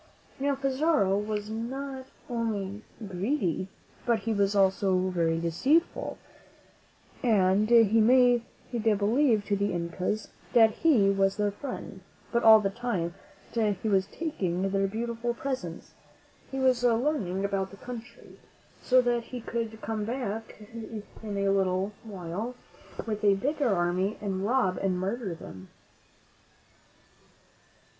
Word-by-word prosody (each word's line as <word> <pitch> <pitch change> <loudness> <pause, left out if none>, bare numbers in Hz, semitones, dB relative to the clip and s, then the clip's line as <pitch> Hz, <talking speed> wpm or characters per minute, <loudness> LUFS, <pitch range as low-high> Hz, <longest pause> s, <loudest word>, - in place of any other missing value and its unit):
Now, 280 +1 +1
Pizarro 275 -6 +2
was 210 +1 -2
not 260 +4 -5 0.2
only 215 -4 -2 0.3
greedy, 190 - -1 0.4
but 235 -3 +1
he 225 +2 -1
was 200 0 +1
also 190 -1 +3
very 165 -2 +1
deceitful, 260 - +1 1.0
and 205 -2 +3
he 225 -2 +6
made 245 +1 +5 0.3
believe 220 +1 +2
to 205 - +1
the 200 +1 0
Incas 180 +5 -2 0.2
that 225 -2 +7
he 225 -10 +3
was 195 0 +1
their 205 -1 +1
friend; 205 -4 -7 0.3
but 235 - +2
all 220 -1 +9
the 195 -2 -1
time 195 -7 -2 0.4
that 215 -3 +1
he 220 - +1
was 195 -1 +2
taking 195 - -2
their 195 0 +1
beautiful 235 +3 -3
presents, 245 -12 -5 0.6
he 270 - -5
was 255 -2 +2
learning 230 - +1
about 195 -1 -1
the 200 - -13
country, 245 +1 -10 0.4
so 255 0 +4
that 240 -1 0
he 250 +1 -6
could 225 -1 -4
come 220 -1 -2
back 225 -2 -4 0.6
in 210 -2 -4
a 200 0 +1
little 190 0 +1
while 205 +3 -5 0.5
with 215 -2 -3
a 200 -1 +5
bigger 280 +5 0
army 185 +2 +1
and 195 -2 -2
rob 230 -7 +1
and 190 -2 0
murder 195 0 -2
them. 95 - -11
215 Hz, 130 wpm, -28 LUFS, 195-240 Hz, 1.0 s, all